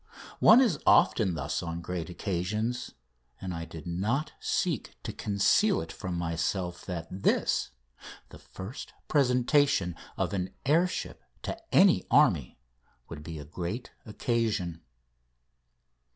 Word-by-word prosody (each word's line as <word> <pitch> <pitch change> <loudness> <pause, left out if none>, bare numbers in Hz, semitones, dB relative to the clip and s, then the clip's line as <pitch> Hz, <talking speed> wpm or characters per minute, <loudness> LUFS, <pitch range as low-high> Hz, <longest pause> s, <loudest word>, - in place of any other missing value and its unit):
One 230 +4 +8
is 210 - +2
often 95 -7 +4
thus 75 -1 -2
on 85 -1 -4
great 85 -1 -4
occasions, 105 +7 -3 0.4
and 95 -1 -5
I 85 0 -5
did 80 -2 -10
not 105 - -1
seek - - -1
to - - -5
conceal 105 - +2
it 80 - -6
from 90 -1 -5
myself 85 +2 -2
that 90 -3 -4
this 95 +1 +1 0.6
the - - -13
first 100 +9 -9
presentation 125 - +2 0.2
of - - -1
an 95 -1 -3
air 165 +6 +4
ship - - -5 0.2
to - - -3 0.2
any 190 -1 +5
army 90 - +3 0.5
would 75 - -7
be 80 +1 -7
a 75 - -8
great 90 - -5
occasion. 105 -6 -1
95 Hz, 125 wpm, -29 LUFS, 85-125 Hz, 0.6 s, One